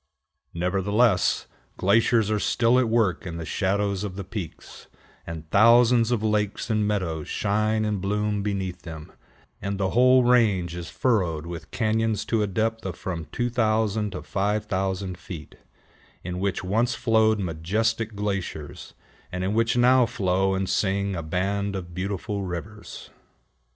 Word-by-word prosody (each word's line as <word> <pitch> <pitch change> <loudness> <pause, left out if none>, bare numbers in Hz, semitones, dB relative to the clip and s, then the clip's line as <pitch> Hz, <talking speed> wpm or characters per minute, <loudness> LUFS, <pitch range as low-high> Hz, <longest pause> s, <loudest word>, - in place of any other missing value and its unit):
Nevertheless, 95 +3 +2 0.3
glaciers 110 +2 +3
are 105 - +1
still 120 +4 +3
at 125 -3 +1
work 105 -5 +1
in 85 -1 -5
the 85 - -5
shadows 100 +4 0
of 100 -3 -5
the 100 - -5
peaks, 95 -3 -8 0.4
and 80 -1 -7
thousands 115 +2 +5
of 120 -3 0
lakes 105 0 0
and 105 -1 +1
meadows 85 -7 -2
shine 110 +1 0
and 105 -3 -1
bloom 105 +1 -1
beneath 95 -3 -3
them, 80 -3 -9 0.5
and 100 0 -3
the 95 -1 0
whole 125 +1 +5
range 105 -8 +3
is 85 -2 -6
furrowed 90 -11 0
with 85 -1 -7
cañons 110 -1 0
to 115 -2 +1
a 105 - +1
depth 110 +3 -1
of 95 -3 -4
from 90 -5 -5
2000 110 -3 0
to 90 - -6
5000 95 -2 -1
feet, 80 -6 -9 0.7
in 90 0 -4
which 100 0 -1
once 115 +6 +1
flowed 110 -1 +3
majestic 105 +6 -1
glaciers, 100 -7 -4 0.4
and 90 0 -3
in 95 +2 0
which 115 +2 +1
now 125 0 +5
flow 95 -1 0
and 95 0 -1
sing 100 0 0
a 85 - -3
band 100 +5 -1
of 85 -2 -6
beautiful 100 +3 -3
rivers. 95 +4 -7
100 Hz, 145 wpm, -25 LUFS, 90-110 Hz, 0.7 s, thousands